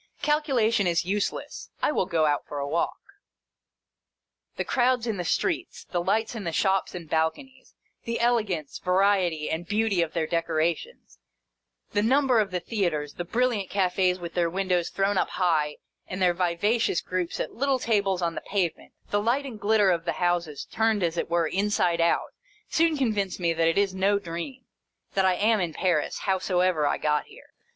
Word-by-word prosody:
Calculation 250 - +2
is 170 0 +1
useless. 200 +2 -3
I - - +1
will 190 - 0
go 165 -4 +2
out 145 -1 0
for 145 - -6
a 140 0 -2
walk. 165 +4 -1 1.6
The - - -2
crowds 250 -1 +2
in 225 -4 -2
the 180 - -2
streets, 350 - -1
the 175 - 0
lights 220 +6 0
in 225 -3 -5
the 170 - -2
shops 190 +2 +1
and 170 -2 -7
balconies, 160 - -2 0.3
the 230 0 -2
elegance, 215 -11 0
variety, 180 -4 +2
and 170 +2 -3
beauty 210 -3 +1
of 165 -2 -2
their 165 -2 0
decorations, 165 0 -2 0.7
the 205 - +1
number 260 +1 +3
of 210 -2 +1
the 180 -1 -2
theatres, 170 -7 -2
the 175 - -4
brilliant 225 0 0
cafes 185 -1 +1
with 170 -2 -7
their 170 -1 +1
win 190 +2 -3
dows 175 -2 +1
thrown 195 0 +1
up - - 0
high 155 -5 0 0.3
and 185 - -5
their 180 -2 +3
vivacious 180 +4 +1
groups 180 -2 -3
at - - -3
little 275 +2 +1
tables 200 -6 0
on 170 -1 0
the - - -5
pavement, 190 -5 -2 0.2
the 205 - +2
light 245 +6 +1
and 235 -6 -7
glitter 205 -2 +4
of 170 -1 -1
the 170 - 0
houses 175 -4 -1
turned 220 -3 +1
as 170 -1 0
it 170 - -2
were 170 -1 +2
inside 180 -1 +1
out, 170 - +1 0.4
soon 325 -1 +2
convince 210 -9 -1
me 170 -2 +1
that 165 0 +2
it 165 - +1
is 200 -1 +2
no 195 +2 +2
dream; 175 +8 -6 0.5
that 195 -1 +2
I 185 -1 +3
am 215 +3 +2
in 170 -3 -2
Paris, 175 -5 0
howsoever 185 -4 +1
I - - +1
got 150 -1 0
here. - - -17
185 Hz, 185 wpm, -26 LUFS, 170-220 Hz, 1.6 s, glitter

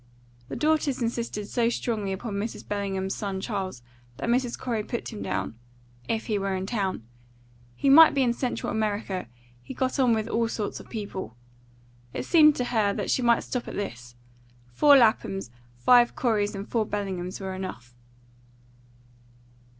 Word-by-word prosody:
The - - -4
daughters 305 -3 +1
insisted 230 -3 -2
so 235 +1 +1
strongly 220 -5 -2
upon 205 +3 -4
Mrs. 205 +3 -4
Bellingham's 195 -2 -2
son 195 -2 -3
Charles, 190 - -4 0.3
that - - -3
Mrs. 245 0 +1
Corey 230 -4 -2
put 235 +2 -5
him 210 - -7
down 115 - -3 0.5
if 225 0 -1
he 210 -3 0
were 195 -1 -1
in 185 0 -3
town; 195 - -2 0.7
he 275 - -1
might 315 +3 +8
be 275 - +3
in 240 -2 +2
Central 245 0 -2
America; 205 - -2 0.3
he 125 - -9
got 260 +1 -1
on 245 -3 +4
with 220 0 -2
all 230 0 +1
sorts 215 -2 -3
of - - -13
people. 200 - -6 0.8
It - - -3
seemed 305 -3 +6
to 250 - -1
her 205 -3 +2
that - - -2
she - - +2
might 235 -1 +3
stop 250 -2 -4
at - - -6
this: 120 - -6 0.6
four 285 - +7
Laphams, 205 - +2 0.3
five 240 - +5
Coreys, 210 -4 0
and 195 +1 -6
four 230 -2 +1
Bellinghams 190 -3 -3
were 190 -1 -4
enough. 155 -11 -7
215 Hz, 165 wpm, -26 LUFS, 195-240 Hz, 0.8 s, might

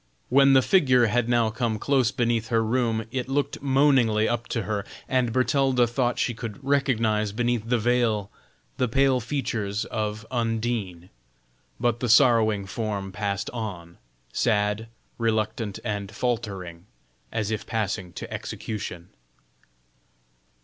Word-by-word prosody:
When 135 +1 +6
the 130 -1 +6
figure 130 - +4
had 120 +2 +1
now 120 -2 +3
come 115 -1 -1
close 130 0 +2
beneath 120 -3 0
her 115 0 +2
room, 115 -1 0
it 130 0 -3
looked 140 +1 -1
moaningly 130 -6 +3
up 120 -1 -2
to 115 - -2
her, 105 -1 -2 0.2
and 125 -2 +1
Bertalda 130 0 +2
thought 120 +1 0
she 120 - 0
could 115 -2 -6
recognize 115 -7 +1
beneath 120 0 -1
the 125 - +3
veil 115 -3 +1 0.5
the 125 - +1
pale 135 +2 +3
features 110 -5 -2
of 105 -1 -3
Undine. 115 -7 -2 0.7
But 120 -1 +1
the 125 - -2
sorrowing 110 -4 +4
form 100 -1 -4
passed 100 +1 -3
on, 95 -8 -6 0.3
sad, 105 -1 +1 0.3
reluctant, 110 -2 -1
and 105 -3 -3
faltering, 95 -7 -3 0.4
as 110 -1 -2
if 110 - -3
passing 95 -5 -2
to - - -7
execution. 90 -5 -6
115 Hz, 130 wpm, -25 LUFS, 105-125 Hz, 0.7 s, When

